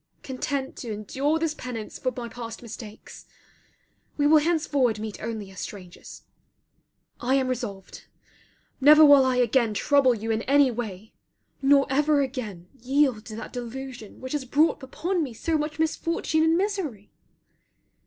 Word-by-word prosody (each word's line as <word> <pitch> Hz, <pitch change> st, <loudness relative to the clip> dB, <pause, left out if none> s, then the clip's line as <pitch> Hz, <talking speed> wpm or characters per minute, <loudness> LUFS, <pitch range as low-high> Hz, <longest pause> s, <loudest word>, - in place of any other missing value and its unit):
Content 265 Hz, +1 st, -3 dB
to 235 Hz, -, -6 dB
endure 265 Hz, +9 st, -1 dB
this 320 Hz, -1 st, -1 dB
penance 245 Hz, -7 st, -7 dB
for 255 Hz, -, -1 dB
my 240 Hz, -1 st, -4 dB
past 230 Hz, 0 st, -8 dB
mistakes. 220 Hz, -2 st, -10 dB, 0.9 s
We 290 Hz, -, +2 dB
will 310 Hz, +1 st, +6 dB
henceforward 290 Hz, -7 st, +1 dB
meet 215 Hz, -1 st, -6 dB
only 215 Hz, -3 st, -5 dB
as 190 Hz, -, -11 dB
strangers. 185 Hz, -4 st, -9 dB, 1.0 s
I 255 Hz, +2 st, +1 dB
am 265 Hz, -1 st, +1 dB
resolved. 230 Hz, -7 st, -5 dB, 0.7 s
Never 300 Hz, +3 st, +8 dB
will 285 Hz, -2 st, +8 dB
I 260 Hz, -1 st, +1 dB
again 240 Hz, -2 st, +2 dB
trouble 265 Hz, +3 st, +3 dB
you 225 Hz, +1 st, -3 dB
in 220 Hz, 0 st, 0 dB
any 280 Hz, -2 st, +5 dB
way; 220 Hz, -3 st, -6 dB, 0.5 s
nor 275 Hz, 0 st, +5 dB
ever 295 Hz, +2 st, +2 dB
again 225 Hz, -10 st, -5 dB
yield 260 Hz, -3 st, +1 dB
to 215 Hz, -, -8 dB
that 225 Hz, -, -8 dB
delusion 245 Hz, -2 st, -7 dB
which 260 Hz, +1 st, -6 dB
has 295 Hz, -2 st, -1 dB
brought 290 Hz, +5 st, +2 dB
upon 345 Hz, +7 st, -2 dB
me 260 Hz, -7 st, -4 dB
so 325 Hz, +8 st, -1 dB
much 300 Hz, 0 st, -2 dB
misfortune 320 Hz, 0 st, 0 dB
and 320 Hz, +1 st, +3 dB
misery. 360 Hz, -, -3 dB
260 Hz, 150 wpm, -25 LUFS, 225-295 Hz, 1.0 s, Never